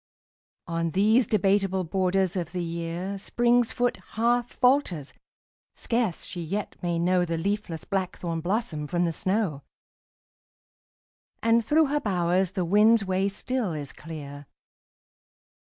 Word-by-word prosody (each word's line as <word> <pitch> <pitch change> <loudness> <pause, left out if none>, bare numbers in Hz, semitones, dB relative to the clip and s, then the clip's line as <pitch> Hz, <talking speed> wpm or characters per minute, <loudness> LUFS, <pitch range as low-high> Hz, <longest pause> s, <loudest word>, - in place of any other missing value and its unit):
On 165 -1 -1
these 215 - +3
debateable* 195 -2 +2
borders 185 +1 0
of 175 -2 -3
the 180 -1 -2
year 170 +3 -4
Spring's 240 +3 +2
foot 245 -1 0 0.2
half 240 +1 +1
falters; 250 - +1 0.6
scarce 230 -7 -1
she 175 - -6
yet 195 +6 -3
may 175 -2 -1
know 180 +1 +2
The 165 -1 -2
leafless 195 -2 -3
blackthorn 180 -3 -2
blossom 175 -5 -2
from 175 +2 0
the 170 - 0
snow; 185 -4 -1 1.8
And 230 0 +4
through 310 +7 +4
her 295 +1 0
bowers 185 -3 +1
the 185 -3 -1
wind's 210 +4 +4
way 190 +1 +1
still 220 -1 -2
is 145 -3 -5
clear. 145 -3 -9
190 Hz, 125 wpm, -26 LUFS, 170-220 Hz, 1.8 s, And